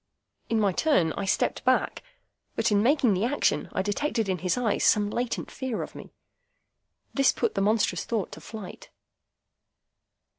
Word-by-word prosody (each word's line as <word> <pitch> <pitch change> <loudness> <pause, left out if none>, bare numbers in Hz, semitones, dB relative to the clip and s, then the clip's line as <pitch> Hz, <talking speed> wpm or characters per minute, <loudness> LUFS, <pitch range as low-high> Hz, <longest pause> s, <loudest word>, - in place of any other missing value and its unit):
In 225 - +1
my 205 -2 +3
turn, 180 - +2
I 200 - -3
stepped 190 - 0
back. - - +1 0.5
But 225 - +1
in 205 -1 +4
making 255 -2 +3
the 190 +2 0
action, 270 +5 +1
I 190 - -1
detected 225 +2 -1
in 185 -2 -1
his 180 +3 0
eyes 235 -4 0
some 205 -1 +3
latent 240 +1 -3
fear 260 -4 -3
of - - -9
me. - - -11 1.0
This 275 -1 +4
put - - -1
the 195 - -1
monstrous 205 -3 +1
thought 220 -5 -2
to - - -10
flight. 215 -5 -9
215 Hz, 160 wpm, -27 LUFS, 195-245 Hz, 1.0 s, in